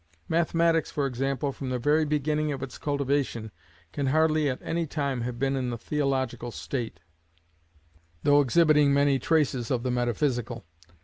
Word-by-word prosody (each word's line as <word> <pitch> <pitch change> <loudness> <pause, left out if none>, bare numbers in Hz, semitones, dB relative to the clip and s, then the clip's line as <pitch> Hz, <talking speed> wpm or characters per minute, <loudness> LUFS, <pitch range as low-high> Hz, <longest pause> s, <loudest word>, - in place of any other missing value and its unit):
Mathematics, 165 0 +2
for 145 - -1
example, 135 +2 -1
from 135 -1 -6
the 130 - -1
very 150 +5 +2
beginning 150 +1 0
of 135 - -4
its 130 -3 -7
cultivation, 140 -6 -1 0.4
can 140 -2 -1
hardly 155 +1 +3
at 130 - -2
any 165 0 -1
time 140 -4 -2
have 120 0 -4
been 135 +2 0
in 130 -2 -1
the 120 - -3
theological 130 -2 -2
state, 115 -6 -5 1.2
though 145 0 +5
exhibiting 150 0 +4
many 140 -1 +3
traces 135 -5 +1
of 125 -3 0
the 130 - 0
metaphysical. 120 - -1
140 Hz, 150 wpm, -27 LUFS, 125-150 Hz, 1.2 s, though